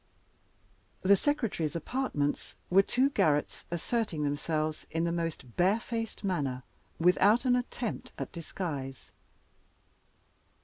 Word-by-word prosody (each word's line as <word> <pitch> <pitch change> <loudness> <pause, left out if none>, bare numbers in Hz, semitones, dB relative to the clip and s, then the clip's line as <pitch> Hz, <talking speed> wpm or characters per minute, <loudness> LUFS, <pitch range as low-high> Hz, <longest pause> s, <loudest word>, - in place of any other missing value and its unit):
The 200 +2 +7
Secretary's 210 - 0
apartments 170 - -1 0.2
were 190 +2 +8
two 260 +7 +2
garrets, 150 - +1
asserting 175 -1 -1
themselves 155 +2 -1
in 165 +1 -1
the 170 - +1
most 165 -7 -3
barefaced 225 +5 0
manner, 140 -10 -1 0.3
without 205 +8 +4
an 250 -1 +5
attempt 245 -2 -3
at - - -4
disguise. 150 -6 -5
175 Hz, 100 wpm, -30 LUFS, 155-225 Hz, 0.3 s, were